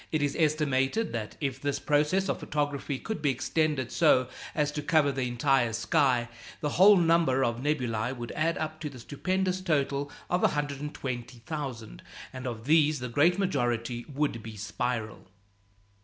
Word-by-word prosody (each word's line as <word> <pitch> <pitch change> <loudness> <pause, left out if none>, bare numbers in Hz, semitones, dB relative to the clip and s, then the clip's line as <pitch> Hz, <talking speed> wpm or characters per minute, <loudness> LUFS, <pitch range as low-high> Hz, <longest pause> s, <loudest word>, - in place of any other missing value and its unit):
It 155 -2 +1
is 145 -1 0
estimated 150 +5 +1
that 110 -3 -5
if 135 -3 -3
this 145 -1 -1
process 150 +6 +1
of - - -1
photography 145 -1 -2
could 220 +2 -5
be 145 - +2
extended 135 0 0
so 130 0 +4 0.3
as 150 -1 +1
to 150 - -3
cover 145 -1 +3
the 130 -2 -2
entire 120 -1 +2
sky, 120 +2 +2 0.3
the 150 - -1
whole 205 +1 +9
number 165 -6 +3
of 115 -2 0
nebulæ 125 -4 -1
would 120 -1 -6
add 165 +2 0
up 155 0 -4
to 155 -1 -4
the 135 - -12
stupendous 185 +9 -1
total 145 -4 0 0.2
of 180 +1 0
120,000; 135 -3 -3 0.3
and 130 0 -6
of 115 -2 -5
these 155 0 +4
the 125 -1 -5
great 160 +9 +3
majority 120 - -1
would 140 -4 -1
be 110 -1 -9
spiral. 110 +1 -3
140 Hz, 155 wpm, -28 LUFS, 120-155 Hz, 0.3 s, whole